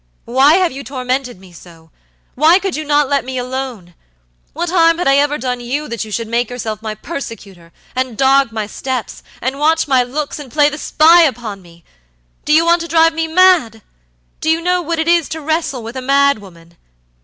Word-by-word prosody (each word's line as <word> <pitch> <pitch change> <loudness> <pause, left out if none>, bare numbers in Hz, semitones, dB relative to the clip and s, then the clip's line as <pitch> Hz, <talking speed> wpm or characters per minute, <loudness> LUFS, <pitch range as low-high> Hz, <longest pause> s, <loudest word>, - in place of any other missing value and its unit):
Why 265 +6 +4
have 365 -2 +2
you 275 +1 -8
tormented 255 -3 -4
me 185 -1 -16
so? 165 -2 -16 0.4
Why 315 +6 +4
could 390 -2 -3
you 310 - -4
not 295 -1 +2
let 280 0 0
me 260 +1 -6
alone? 250 -8 -5 0.6
What 340 +2 -3
harm 330 -2 +4
had 355 - -1
I 275 0 +4
ever 290 +1 +1
done 250 -1 -3
you 270 +5 -4
that 235 -1 -4
you 220 - -10
should 230 +2 -3
make 235 +1 -1
yourself 220 -3 -5
my 215 -1 -5
persecutor, 205 - -9 0.2
and 255 -3 -3
dog 270 -2 +3
my 220 -1 -3
steps, 255 +3 -5 0.2
and 265 +3 -2
watch 320 +2 +2
my 260 -2 +3
looks, 280 +5 -4
and 275 -4 -10
play 295 +1 +3
the 300 +1 -7
spy 330 +4 +5
upon 235 - -1
me? 170 -1 -19 0.6
Do - - -1
you 320 +2 +5
want 340 0 +3
to 335 - -5
drive 330 0 +3
me 325 0 -2
mad? 320 - +3 0.6
Do 315 - -2
you 320 +1 +2
know 360 +1 0
what 335 0 -3
it 320 0 -1
is 340 -2 +2
to 320 - -5
wrestle 315 -5 -2
with 230 +3 -8
a 260 - -4
mad 280 -1 +2
woman? 170 -4 -17
270 Hz, 210 wpm, -16 LUFS, 230-320 Hz, 0.6 s, spy